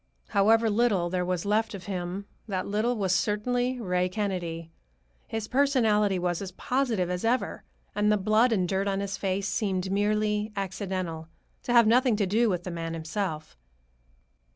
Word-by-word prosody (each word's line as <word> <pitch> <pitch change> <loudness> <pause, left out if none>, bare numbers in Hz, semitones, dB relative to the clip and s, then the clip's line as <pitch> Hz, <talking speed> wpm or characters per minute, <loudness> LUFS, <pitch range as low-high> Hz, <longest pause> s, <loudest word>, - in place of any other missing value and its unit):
However 225 +2 +4
little 205 -6 +2
there 180 -1 0
was 180 0 -2
left 215 +1 +1
of 190 - -8
him, 185 +1 -4 0.2
that 190 -3 -2
little 220 +4 0
was 190 -3 +1
certainly 245 +6 0
Ray 180 -4 0
Kennedy. 175 -5 -3 0.6
His 225 -2 -4
personality 225 -8 +2
was 175 0 -1
as 190 -2 -5
positive 240 -6 0
as 180 0 -3
ever, 240 +3 0 0.3
and 210 0 +2
the 210 - +3
blood 215 +5 +3
and 185 -5 +1
dirt 195 +2 0
on 195 -1 0
his 200 0 -3
face 195 +1 -1
seemed 190 -2 -1
merely 210 +1 +1
accidental, 185 -4 -4 0.3
to 240 - -2
have 235 -1 +7
nothing 245 +1 +4
to 205 -1 +1
do 220 +5 +2
with 180 -3 -1
the 180 - -5
man 165 -1 -4
himself. 160 - -4
200 Hz, 165 wpm, -27 LUFS, 180-220 Hz, 0.6 s, have